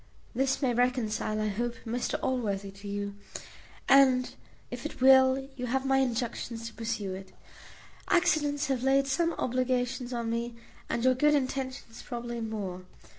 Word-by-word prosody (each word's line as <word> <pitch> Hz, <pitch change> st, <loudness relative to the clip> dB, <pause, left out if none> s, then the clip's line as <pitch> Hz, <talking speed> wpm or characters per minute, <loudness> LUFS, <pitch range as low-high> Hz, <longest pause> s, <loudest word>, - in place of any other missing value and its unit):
This 270 Hz, +3 st, 0 dB
may 250 Hz, -2 st, +2 dB
reconcile, 230 Hz, -3 st, 0 dB
I 215 Hz, 0 st, 0 dB
hope, 235 Hz, +4 st, -2 dB
Mr 235 Hz, +2 st, -2 dB
Allworthy 205 Hz, -6 st, -1 dB
to 200 Hz, +1 st, -11 dB
you; 200 Hz, 0 st, -3 dB, 0.7 s
and 260 Hz, -2 st, +5 dB, 0.4 s
if -, -, -6 dB
it -, -, -6 dB
will, 265 Hz, 0 st, +6 dB
you 250 Hz, -2 st, -4 dB
have 265 Hz, +2 st, 0 dB
my 270 Hz, 0 st, +3 dB
injunctions 235 Hz, -2 st, -2 dB
to 230 Hz, -, -6 dB
pursue 220 Hz, -4 st, -3 dB
it. 190 Hz, 0 st, -9 dB, 0.8 s
Accidents 300 Hz, -4 st, +2 dB
have 265 Hz, -4 st, -1 dB
laid 270 Hz, +1 st, +3 dB
some 330 Hz, +5 st, +1 dB
obligations 255 Hz, 0 st, -1 dB
on 235 Hz, -2 st, -2 dB
me, 235 Hz, 0 st, -2 dB, 0.3 s
and 235 Hz, -, -1 dB
your 260 Hz, 0 st, +5 dB
good 295 Hz, +4 st, +3 dB
intentions 260 Hz, -3 st, -3 dB
probably 240 Hz, -1 st, -5 dB
more. 205 Hz, -5 st, -4 dB
245 Hz, 150 wpm, -29 LUFS, 225-265 Hz, 0.8 s, will